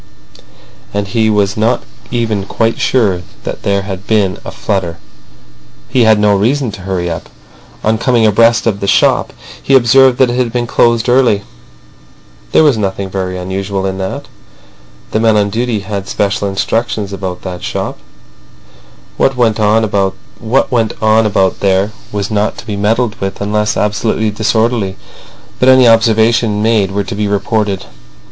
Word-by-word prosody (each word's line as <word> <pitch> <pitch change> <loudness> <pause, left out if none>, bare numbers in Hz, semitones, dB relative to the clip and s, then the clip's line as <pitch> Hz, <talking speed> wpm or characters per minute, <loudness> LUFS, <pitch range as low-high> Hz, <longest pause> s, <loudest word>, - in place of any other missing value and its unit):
And 100 -1 -2
he 110 +1 +1
was 100 -2 +1
not 115 +3 0 0.3
even 110 -5 -2
quite 115 0 -1
sure 100 -9 +1 0.2
that - - -5
there 100 -1 0
had 95 -1 -7
been 100 -5 +1
a - - -6
flutter. 90 -5 -3 0.9
He 125 -2 +3
had 110 -1 +5
no 105 -1 +3
reason 120 +5 0
to 100 - -10
hurry 90 -2 -3
up. 80 -1 -5 0.5
On 110 +1 +1
coming 120 -3 +2
abreast 115 +1 +3
of 105 -4 0
the 100 - -3
shop - - +2 0.3
he 135 - +2
observed 130 +1 +5
that 130 -2 +3
it 120 - -2
had 125 -2 0
been 120 0 -1
closed 115 0 +2
early. 120 -5 +3 1.1
There - - +5
was 140 -7 +3
nothing 95 -1 -3
very 95 -1 -3
unusual 95 +1 -3
in 95 0 -3
that. 95 0 -5 0.8
The 110 - 0
men 110 -1 +3
on 100 -1 +1
duty 115 -1 -1
had 100 -1 -5
special 100 0 -1
instructions 100 +1 -2
about 95 -2 -5
that 90 -2 -6
shop: - - -4 1.2
what 135 -1 +1
went 115 -3 +2
on 110 +1 +3
about 110 0 0
there 95 +1 +1 0.2
was 100 0 -3
not 105 0 0
to - - -9
be 105 -3 -4
meddled 110 +3 0
with 95 0 -3
unless 105 +2 -1
absolutely 105 +1 0
disorderly, 110 -1 0 0.6
but 130 - +4
any 130 -1 +6
observations 115 -1 +3
made 110 -4 +2
were 100 +1 -2
to 95 - -6
be 105 +1 -1
reported. 100 -1 -1
105 Hz, 155 wpm, -13 LUFS, 100-115 Hz, 1.2 s, any